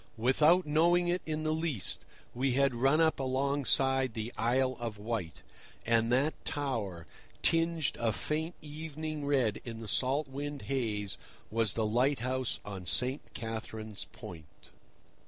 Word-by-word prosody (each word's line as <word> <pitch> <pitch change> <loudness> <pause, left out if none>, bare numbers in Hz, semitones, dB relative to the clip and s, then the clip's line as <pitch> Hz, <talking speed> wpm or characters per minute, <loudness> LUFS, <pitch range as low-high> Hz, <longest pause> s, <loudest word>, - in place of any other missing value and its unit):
Without 150 +10 +4
knowing 170 +4 +3
it 180 +1 +1
in 155 0 -2
the 155 0 +1
least, 155 - -1 0.3
we 130 +1 +1
had 140 0 +3
run 135 +6 +3
up 160 -3 +3
alongside 135 -1 +2
the 110 +2 -4
Isle 130 +3 +2
of 115 -3 -4
Wight, 105 -7 -4 0.4
and 115 0 +3
that 140 +5 +1
tower, 110 - -3 0.4
tinged 165 -2 +3
a 115 -1 +2
faint 160 - -2
evening 155 0 -5
red 130 -7 +2
in 115 -2 -6
the 115 - -7
salt 135 +7 +2
wind 145 +1 -5
haze, 110 -7 -2 0.3
was 115 -3 +2
the 110 - +1
lighthouse 130 +2 +1
on 95 -3 -7
St. 130 - +2
Catherine's 110 -2 -5
Point. 75 -2 -12
130 Hz, 135 wpm, -31 LUFS, 115-150 Hz, 0.4 s, Without